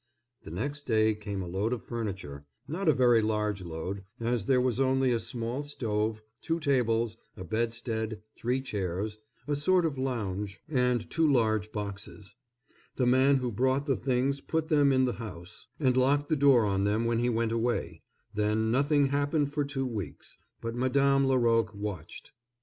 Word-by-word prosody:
The -, -, -9 dB
next 140 Hz, -, -4 dB
day 110 Hz, -2 st, +3 dB
came 105 Hz, -2 st, -5 dB
a -, -, -6 dB
load 100 Hz, +7 st, -1 dB
of 125 Hz, -, -4 dB
furniture,—not 100 Hz, -, -4 dB
a -, -, +8 dB
very 120 Hz, -5 st, +4 dB
large 105 Hz, -2 st, -1 dB
load, 90 Hz, +3 st, -5 dB, 0.2 s
as 115 Hz, -2 st, -1 dB
there 130 Hz, +1 st, +3 dB
was 125 Hz, -1 st, 0 dB
only 130 Hz, -1 st, +3 dB
a 120 Hz, -, +1 dB
small 120 Hz, +3 st, -4 dB
stove, 110 Hz, -6 st, -2 dB, 0.2 s
two 165 Hz, 0 st, -1 dB
tables, 120 Hz, -6 st, +1 dB, 0.2 s
a -, -, -6 dB
bedstead, 110 Hz, +1 st, -2 dB, 0.2 s
three 125 Hz, +3 st, -1 dB
chairs, 105 Hz, -2 st, -3 dB, 0.3 s
a 145 Hz, -, +1 dB
sort 175 Hz, +5 st, +3 dB
of 145 Hz, -5 st, -2 dB
lounge, 105 Hz, -6 st, -3 dB
and 125 Hz, -5 st, +1 dB
two 160 Hz, -2 st, +2 dB
large 110 Hz, -4 st, +1 dB
boxes. 100 Hz, -2 st, -7 dB, 0.6 s
The 125 Hz, -, +1 dB
man 130 Hz, +3 st, +5 dB
who 125 Hz, -2 st, -1 dB
brought 130 Hz, +5 st, +1 dB
the 135 Hz, -3 st, +1 dB
things 135 Hz, +2 st, 0 dB
put 160 Hz, 0 st, -2 dB
them 145 Hz, -3 st, +4 dB
in 130 Hz, -1 st, +3 dB
the 125 Hz, -, 0 dB
house, 90 Hz, -3 st, -9 dB
and 130 Hz, -4 st, +2 dB
locked 140 Hz, +3 st, +2 dB
the 155 Hz, -, +3 dB
door 135 Hz, -5 st, +5 dB
on 100 Hz, -1 st, +1 dB
them 105 Hz, +3 st, +1 dB
when 115 Hz, 0 st, +1 dB
he 120 Hz, +1 st, +1 dB
went 115 Hz, -1 st, 0 dB
away; 115 Hz, +1 st, -1 dB, 0.3 s
then 105 Hz, +1 st, +1 dB
nothing 145 Hz, +3 st, +3 dB
happened 145 Hz, +1 st, 0 dB
for 150 Hz, -1 st, +1 dB
two 140 Hz, -1 st, -3 dB
weeks, 105 Hz, -, -6 dB, 0.2 s
but 115 Hz, 0 st, -3 dB
Madame 135 Hz, +2 st, +2 dB
Laroque 115 Hz, -4 st, +2 dB
watched. 100 Hz, -5 st, -7 dB
120 Hz, 170 wpm, -29 LUFS, 105-135 Hz, 0.6 s, a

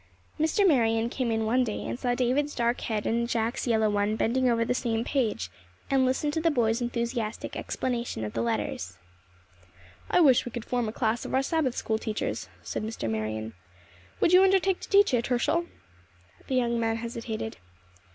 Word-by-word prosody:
Mr. 320 Hz, +6 st, +3 dB
Marion 230 Hz, -6 st, +2 dB
came 255 Hz, -3 st, -1 dB
in 225 Hz, -1 st, 0 dB
one 250 Hz, +4 st, +3 dB
day 215 Hz, -4 st, -3 dB
and -, -, -4 dB
saw 245 Hz, -1 st, 0 dB
David's 260 Hz, +4 st, 0 dB
dark 235 Hz, 0 st, 0 dB
head 215 Hz, -2 st, -2 dB
and 235 Hz, +1 st, 0 dB
Jack's 230 Hz, +2 st, -1 dB
yellow 220 Hz, -2 st, +3 dB
one 205 Hz, +1 st, +1 dB
bending 250 Hz, +3 st, +1 dB
over 230 Hz, -1 st, +2 dB
the 245 Hz, -, +1 dB
same 230 Hz, -2 st, -1 dB
page, 220 Hz, -, -1 dB, 0.4 s
and 265 Hz, -1 st, +4 dB
listened 295 Hz, +3 st, 0 dB
to 320 Hz, -, 0 dB
the 330 Hz, -, +3 dB
boy's 235 Hz, -5 st, +1 dB
enthusiastic 235 Hz, -2 st, -3 dB
explanation 240 Hz, -, -3 dB
of 105 Hz, -, -6 dB
the 115 Hz, -, -1 dB
letters. 105 Hz, -6 st, -2 dB, 1.1 s
"I -, -, +3 dB
wish 275 Hz, -8 st, +6 dB
we 245 Hz, -, -7 dB
could 235 Hz, 0 st, -6 dB
form 245 Hz, -3 st, -1 dB
a -, -, -4 dB
class 225 Hz, 0 st, -1 dB
of -, -, -3 dB
our 265 Hz, -, +3 dB
Sabbath 275 Hz, -4 st, 0 dB
school 220 Hz, -1 st, -1 dB
teachers," 215 Hz, -1 st, -3 dB
said -, -, -4 dB
Mr. 220 Hz, -, -4 dB
Marion. 110 Hz, 0 st, -3 dB, 0.7 s
"Would 345 Hz, -, +4 dB
you 365 Hz, -, +8 dB
undertake 385 Hz, -1 st, +3 dB
to -, -, -9 dB
teach 405 Hz, -6 st, +5 dB
it, 240 Hz, -1 st, +1 dB
Herschel?" 310 Hz, +7 st, +1 dB, 0.8 s
The 265 Hz, -, -1 dB
young 235 Hz, -2 st, +1 dB
man 225 Hz, -1 st, +1 dB
hesitated. 230 Hz, -, -5 dB
235 Hz, 185 wpm, -27 LUFS, 220-260 Hz, 1.1 s, you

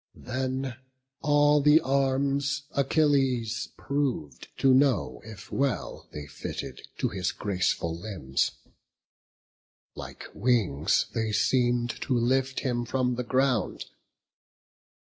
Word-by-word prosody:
Then 130 Hz, 0 st, -3 dB, 0.4 s
all 145 Hz, 0 st, +4 dB
the 150 Hz, +2 st, +6 dB
arms 140 Hz, 0 st, +1 dB
Achilles 135 Hz, -4 st, +1 dB
prov'd, 135 Hz, -, -2 dB
to 135 Hz, -1 st, +4 dB
know 130 Hz, -, +2 dB
If 105 Hz, -4 st, -11 dB
well 140 Hz, -1 st, -2 dB
they 75 Hz, -1 st, -7 dB
fitted -, -, -6 dB, 0.2 s
to -, -, 0 dB
his 95 Hz, -2 st, -2 dB
graceful 90 Hz, -4 st, -1 dB
limbs: 85 Hz, -8 st, -1 dB, 1.4 s
Like -, -, -9 dB
wings, 100 Hz, -, +2 dB
they 110 Hz, -1 st, -1 dB
seem'd 120 Hz, +1 st, +2 dB
to 130 Hz, -3 st, 0 dB
lift 130 Hz, +2 st, +1 dB
him 120 Hz, -3 st, -1 dB
from 125 Hz, +1 st, 0 dB
the 125 Hz, +1 st, -2 dB
ground. 130 Hz, -1 st, 0 dB
130 Hz, 105 wpm, -27 LUFS, 110-135 Hz, 1.4 s, the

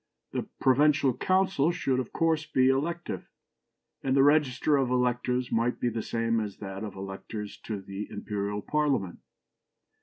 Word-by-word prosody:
The -, -, -3 dB
provincial 140 Hz, -1 st, +4 dB
councils 185 Hz, -4 st, +2 dB
should 130 Hz, -1 st, 0 dB
of 125 Hz, -, -4 dB
course 160 Hz, -1 st, +1 dB
be 130 Hz, 0 st, +3 dB
elective, 165 Hz, +6 st, -2 dB, 0.7 s
and 135 Hz, 0 st, +1 dB
the 135 Hz, -, +6 dB
register 145 Hz, -1 st, +3 dB
of 135 Hz, -3 st, +2 dB
electors 125 Hz, 0 st, 0 dB
might 115 Hz, +2 st, +1 dB
be 120 Hz, -, +1 dB
the 115 Hz, -1 st, -3 dB
same 115 Hz, 0 st, 0 dB
as 105 Hz, -3 st, -4 dB
that 95 Hz, 0 st, -6 dB
of 105 Hz, -3 st, -6 dB
electors 100 Hz, +2 st, -6 dB
to 110 Hz, -3 st, -3 dB
the 100 Hz, +2 st, -6 dB
Imperial 105 Hz, 0 st, -3 dB
Parliament. 140 Hz, -12 st, 0 dB
125 Hz, 150 wpm, -28 LUFS, 105-145 Hz, 0.7 s, the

